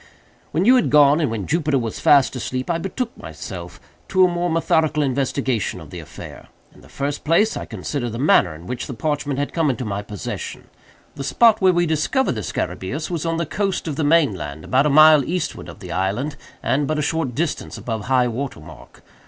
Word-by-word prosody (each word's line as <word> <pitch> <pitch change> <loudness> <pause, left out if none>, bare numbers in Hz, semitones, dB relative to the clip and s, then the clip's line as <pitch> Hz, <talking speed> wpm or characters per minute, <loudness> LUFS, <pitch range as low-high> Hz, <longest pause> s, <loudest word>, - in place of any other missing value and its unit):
"When 165 +5 0
you 255 +3 +7
had 245 - +1
gone, 145 0 +6
and 150 - +1
when 110 -4 -3
Jupiter 155 -3 +1
was 115 -4 -3
fast 140 -2 +4
asleep, 130 +4 -3
I 165 - 0
betook 225 +7 -4
myself - - -8 0.3
to 185 -1 +4
a - - +4
more 175 0 -1
methodical 160 -2 +1
investigation 135 -4 -1
of - - -12
the - - -7
affair. - - -11 0.3
In - - -18
the - - -17
first 140 +1 -3
place 170 +8 +3
I - - -5
considered 130 -5 -4
the 115 - -5
manner 115 - +3
in 80 +3 -12
which 125 +6 -5
the 130 - -6
parchment 145 +1 -2
had 145 0 -2
come 165 -3 +1
into 130 -1 -2
my 100 -1 -3
possession. 100 -1 -7 0.4
The 140 - -6
spot 225 - +4
where 190 -1 +6
we 175 -1 +2
discovered 160 - +1
the 110 - -3
scarabæus 135 - -4
was 170 -1 -2
on 165 0 0
the 170 - -1
coast 195 +3 -2
of 150 - -2
the 155 - -1
main 145 -5 +4
land, 75 -3 -7
about 135 +3 +3
a - - +2
mile 155 0 +7
eastward 165 0 -3
of - - -12
the 90 -3 -8
island, 100 - -1 0.3
and 140 +1 +1
but 155 - -1
a 150 - 0
short 145 -5 -1
distance 165 +1 -2
above 110 -3 -4
high 125 -1 +3
water 120 - -4
mark. 75 0 -14
145 Hz, 215 wpm, -21 LUFS, 125-165 Hz, 0.4 s, you